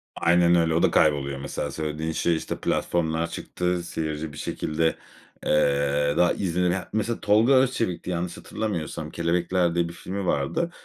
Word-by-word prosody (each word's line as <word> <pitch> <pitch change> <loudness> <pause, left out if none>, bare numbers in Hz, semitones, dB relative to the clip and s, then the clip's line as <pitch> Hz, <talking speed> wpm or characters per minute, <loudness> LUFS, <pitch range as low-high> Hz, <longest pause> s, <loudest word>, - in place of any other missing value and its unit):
Aynen 85 0 +4
öyle, 80 -1 +3
o 85 - +2
da - - +4
kayboluyor 70 -2 +2
mesela. 70 - -4
Söylediğin 80 +1 -3
şey, 85 +1 +1
işte, 80 - -3
platformlar 80 -1 0
çıktı, 90 -1 -2
seyirci 80 -2 -4
bir 75 - -10
şekilde, 80 +1 -1 0.5
eee, 70 -1 +2
daha 90 - +4
izlenen 90 0 0
Mesela 110 +2 -1
Tolga 110 +5 +4
Özçelik'ti 125 -10 +1
yanlış 85 0 -3
hatırlamıyorsam, 85 -7 -4
"Kelebekler" 85 +1 0
diye 85 -1 +1
bir - - -9
filmi 95 +2 -5
vardı. 90 - 0
85 Hz, 150 wpm, -25 LUFS, 80-90 Hz, 0.5 s, Aynen